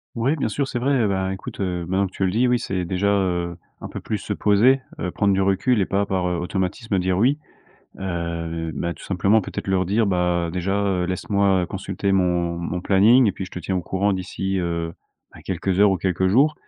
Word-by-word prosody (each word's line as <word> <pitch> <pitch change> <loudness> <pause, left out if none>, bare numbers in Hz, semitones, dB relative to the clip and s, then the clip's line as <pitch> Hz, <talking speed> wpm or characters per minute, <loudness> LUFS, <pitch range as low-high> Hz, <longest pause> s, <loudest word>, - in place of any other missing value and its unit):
Ouais, 125 +6 +1
bien 150 - -1
sûr, 140 -2 -1
c'est 130 - -3
vrai, 125 -2 +2
bah, 95 -1 -1
écoute, 95 - -8
heu, 90 -3 -2
maintenant 95 +2 +1
que 95 - -7
tu - - -2
le 95 - +3
dis, 115 +7 +2
oui, 125 0 +2
c'est 90 -4 -2
déjà, 95 +3 -1
heu, 90 -4 0 0.2
un - - -5
peu - - -6
plus 105 - -3
se 105 - -7
poser, 110 +7 +4 0.2
heu, 90 - -2
prendre 100 +2 +1
du 95 - +1
recul 100 +4 +2
et - - +2
pas 100 +1 +1
par, 95 -2 -1
heu, 90 -1 -1
automatisme 95 +4 -2
dire 90 0 0
oui, 130 +8 +3 0.6
heu, 85 -3 -3
bah, 85 +2 -3
tout - - -15
simplement 100 +4 +2
peut-être 95 - -6
leur 95 -1 +1
dire: 105 +3 +2
«Bah, 90 -2 +1
déjà, 90 +2 -1
heu, 90 -2 0
laisse-moi 95 0 +1
consulter 95 +1 -3
mon 90 -2 +1
mon 85 +1 -3
planning 110 +7 +5
et 100 - +2
puis 95 - -5
je 95 - -11
te - - -6
tiens 95 +2 -3
au 90 - 0
courant 100 +4 0
d'ici, 95 +1 -2
heu, 85 -1 -2 0.4
ben, - - -12
quelques 95 +1 -1
heures 105 -1 +6
ou 95 - +2
quelques 95 +1 0
jours» 140 +10 +4
95 Hz, 225 wpm, -22 LUFS, 90-100 Hz, 0.6 s, heures